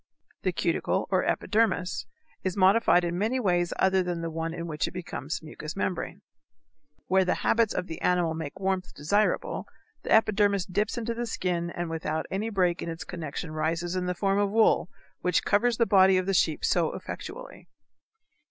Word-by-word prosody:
The - - 0
cuticle, - - 0
or - - +3
epidermis, 215 -4 0 0.4
is 185 +1 -2
modified 190 -1 +5
in 175 +1 -2
many 225 +6 +1
other 255 - -2
ways 175 -3 +2
than 185 -3 +2
the 165 0 -3
one 165 +1 -3
in 170 0 -5
which 155 -3 -2
it - - -9
becomes 160 -4 -5
mucous 155 0 -7
membrane. 190 -2 -3 0.8
Where 190 +1 +3
the 180 - +1
habits 225 -2 +3
of - - -1
the 165 -3 -7
animal 175 -2 +2
make 160 +2 -6
warmth 190 -1 -2
desirable 200 +9 0 0.3
the - - -6
epidermis 205 -3 +3
dips 210 +6 -1
into 235 0 -2
the 235 +1 -3
skin 175 -5 -1
and 175 0 -4
without 160 -1 -2
any 205 +4 -1
break 180 -4 +1
in - - -4
its 165 0 -5
connection 160 -1 -6
rises 165 +3 -1
in 180 -1 -1
the 180 - -1
form 195 +2 +1
of 205 -1 +2
wool, 215 -3 +3 0.3
which 180 -1 +1
covers 225 +3 +2
the 230 - +3
body 190 -3 +5
of 185 - 0
the 195 - 0
sheep 160 -4 +2
so - - +2
effectually. - - -8
180 Hz, 180 wpm, -27 LUFS, 170-205 Hz, 0.8 s, modified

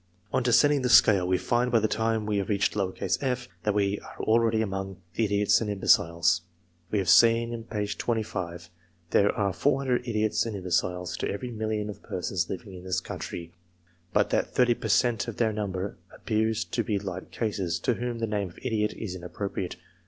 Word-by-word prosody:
On - - +2
descending 140 +4 +4
the 125 - 0
scale, 95 -6 +6
we 90 0 +2
find 120 +5 0
by 115 - +5
the 110 - +1
time 110 -1 0
we 105 -1 0
have 100 - -3
reached 100 0 +1
f, 115 +6 -1
that 105 +1 0
we 100 0 +1
are - - -13
already 110 0 +3
among 95 -2 -4
the 110 +5 +1
idiots 105 +1 +3
and 110 - -2
im 100 -1 -3
beciles. 85 -1 +3 0.5
We 105 - 0
have 95 -2 0
seen 115 +3 +4
inj^jl, 110 +1 -2 0.3
that 85 - -16 0.4
there 100 - +4
are 100 -2 0
400 135 +1 +1
idiots 110 -2 +1
and 110 - -4
imbeciles, 90 -1 -1
to - - -2
every 120 +5 -4
million 110 -2 -2
of 105 - -8
persons 90 -2 -2
living 100 +1 -6
in 90 -1 -10
this 95 0 -1
country; 85 -1 -7 0.6
but - - +2
that - - 0
30 125 -1 +4
per 115 - -5
cent, 115 +1 +2
of 115 - -6
their 110 -2 +1
number, 100 -2 -3
appear 110 0 0
to 115 +2 -2
be 105 -1 0
light 95 -2 -6
cases, 95 -7 -2
to 125 - +2
whom 120 0 -3
the 115 - -1
name 105 -3 -2
of 85 - -18
idiot 110 -4 0
is 105 -5 -5
inappropriate. 95 +1 -4
105 Hz, 190 wpm, -27 LUFS, 95-115 Hz, 0.6 s, scale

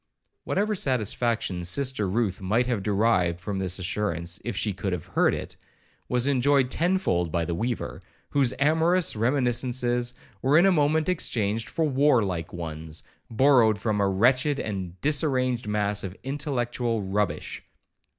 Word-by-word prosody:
Whatever 210 +2 0
satisfaction 115 - 0
Sister 110 +2 0
Ruth 100 -2 -1
might 110 +6 +1
have 120 -5 -1
derived 95 -4 +1
from 95 +2 -4
this 95 -1 -1
assurance, 90 -2 -2
if 120 - -4
she 105 - 0
could 95 0 -3
have 90 - -4
heard - - +2
it, - - -7 0.5
was 125 0 +1
enjoyed 135 -1 +2
tenfold 165 - +1
by 85 0 0
the 85 - -2
weaver, 115 +7 -3 0.3
whose 135 -4 +3
amorous 160 +5 +2
reminiscences 120 0 0 0.3
were 135 +4 +4
in 175 - +6
a 195 - +5
moment 155 -1 +2
exchanged 115 - -1
for 165 - 0
war 140 -4 +3
like 85 -4 -3
ones, 80 -2 -6 0.3
borrowed 115 -3 +4
from 105 -1 -1
a 100 - +2
wretched 125 +8 +2
and 95 -4 -5
disarranged 130 -6 0
mass 105 -1 0
of 95 0 -6
intellectual 125 -5 -2
rubbish. 100 +1 -2
115 Hz, 145 wpm, -26 LUFS, 95-135 Hz, 0.5 s, in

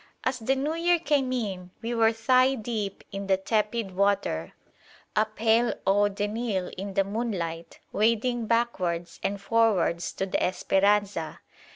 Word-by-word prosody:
As 260 0 -1
the 255 +4 +1
New 285 +4 -1
Year 345 +1 +3
came 285 -5 +1
in, 195 -8 -3
we 235 +1 -2
were 225 -1 +4
thigh 255 +4 +3
deep 215 -4 -4
in 195 0 -5
the 190 -1 +3
tepid 210 0 -1
water, 195 - 0 0.6
a 215 - +4
pale 225 +2 +2
eau 205 +1 +4
de 205 +1 -2
Nil 210 -4 -2
in 195 +1 -6
the 195 - +4
moonlight, 190 -6 -4 0.2
wading 230 +2 +1
backwards 180 -8 -1
and 200 0 -2
forwards 200 -6 +1
to 195 - -2
the 190 - -1
"Esperanza." 195 -2 +1
210 Hz, 150 wpm, -27 LUFS, 195-235 Hz, 0.6 s, were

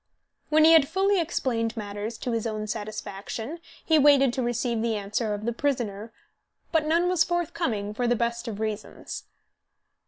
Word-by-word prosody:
When 310 0 +5
he 325 - +8
had 310 -4 +6
fully 390 +3 +2
explained 235 -8 -1
matters 205 +2 -5
to 250 - -3
his 230 0 -1
own 215 -1 -3
satisfaction 215 - -5 0.3
he 315 -1 +4
waited 275 -3 +5
to 260 - -1
receive 240 -1 -1
the 230 -1 0
answer 210 +1 -1
of 210 +1 -7
the 235 - 0
prisoner; 230 -5 -2 0.6
but 315 -2 +2
none 335 +3 +3
was 360 -2 +3
forthcoming, 315 - -2
for 245 +3 -1
the 240 - +3
best 235 +1 -2
of 215 -3 -5
reasons. 215 -1 -5
235 Hz, 165 wpm, -26 LUFS, 215-295 Hz, 0.6 s, he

